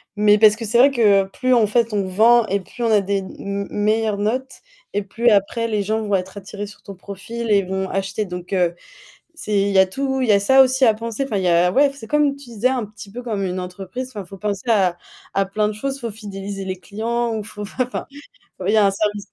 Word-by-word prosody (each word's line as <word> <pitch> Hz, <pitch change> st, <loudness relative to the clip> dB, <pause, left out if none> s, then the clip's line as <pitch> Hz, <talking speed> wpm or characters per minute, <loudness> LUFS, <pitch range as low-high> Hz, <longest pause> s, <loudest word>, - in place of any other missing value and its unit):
Mais 210 Hz, 0 st, +5 dB
parce 215 Hz, -1 st, +6 dB
que 225 Hz, 0 st, -6 dB
c'est 230 Hz, +3 st, +1 dB
vrai 270 Hz, +4 st, +6 dB
que 205 Hz, -6 st, +4 dB
plus 255 Hz, +6 st, 0 dB
en 225 Hz, -4 st, +4 dB
fait, 230 Hz, 0 st, +1 dB
on 200 Hz, -2 st, 0 dB
vend, 225 Hz, +5 st, +5 dB
et 200 Hz, +1 st, 0 dB
plus 235 Hz, +5 st, -8 dB
on 230 Hz, -, +2 dB
a 210 Hz, -2 st, +5 dB
des 200 Hz, +1 st, -1 dB
m 200 Hz, +1 st, -5 dB
meilleures 215 Hz, 0 st, 0 dB
notes, 255 Hz, +6 st, -2 dB, 0.3 s
et 205 Hz, -, 0 dB
plus 230 Hz, +4 st, +1 dB
après 215 Hz, +3 st, +2 dB
les 210 Hz, -2 st, -1 dB
gens 220 Hz, +2 st, -1 dB
vont 205 Hz, -2 st, 0 dB
être 190 Hz, +2 st, -4 dB
attirés 205 Hz, +1 st, -7 dB
sur 210 Hz, -, -14 dB
ton 200 Hz, -3 st, -10 dB
profil 210 Hz, +5 st, -6 dB
et 200 Hz, -1 st, +4 dB
vont 190 Hz, +1 st, -3 dB
acheter 195 Hz, +2 st, -2 dB
donc 180 Hz, +1 st, -7 dB
heu 175 Hz, -2 st, +1 dB, 0.6 s
c'est 210 Hz, -10 st, -1 dB
il 200 Hz, -, +1 dB
y 195 Hz, -, +2 dB
a 190 Hz, -, +7 dB
tout, 265 Hz, +6 st, -2 dB
il 250 Hz, -, 0 dB
y -, -, +6 dB
a 200 Hz, -, +4 dB
ça 265 Hz, +6 st, +6 dB
aussi 260 Hz, 0 st, +2 dB
à 225 Hz, -, +5 dB
penser. 230 Hz, +3 st, -4 dB
Enfin, 265 Hz, -6 st, -3 dB
il 190 Hz, -, -1 dB
y 180 Hz, -, +2 dB
a 175 Hz, +1 st, +4 dB
ouais, 280 Hz, +5 st, +4 dB
f -, -, -13 dB
c'est 225 Hz, -5 st, -10 dB
comme 295 Hz, -2 st, +2 dB
tu 280 Hz, -1 st, -14 dB
disais 230 Hz, +1 st, -2 dB
un 255 Hz, -4 st, -1 dB
petit 210 Hz, 0 st, -12 dB
peu 245 Hz, -, -7 dB
comme 215 Hz, -5 st, -2 dB
une 185 Hz, 0 st, -3 dB
entreprise. 190 Hz, +7 st, -6 dB
Enfin, 210 Hz, -5 st, -7 dB
faut 195 Hz, +2 st, -11 dB
penser 210 Hz, +3 st, -3 dB
à 190 Hz, -5 st, +3 dB, 0.4 s
à 195 Hz, -, +2 dB
plein 210 Hz, +2 st, 0 dB
de -, -, -3 dB
choses, 275 Hz, +6 st, -4 dB
faut 235 Hz, -2 st, -4 dB
fidéliser 200 Hz, -2 st, -7 dB
les 185 Hz, -1 st, -4 dB
clients 230 Hz, +4 st, -2 dB
ou 215 Hz, -, -3 dB
faut 210 Hz, 0 st, -8 dB
f 200 Hz, -, -10 dB
enfin, 250 Hz, 0 st, -2 dB, 0.6 s
il -, -, +3 dB
y -, -, +4 dB
a 210 Hz, -, +5 dB
un 195 Hz, -, +3 dB
service 205 Hz, 0 st, -2 dB
210 Hz, 260 wpm, -21 LUFS, 195-235 Hz, 0.6 s, a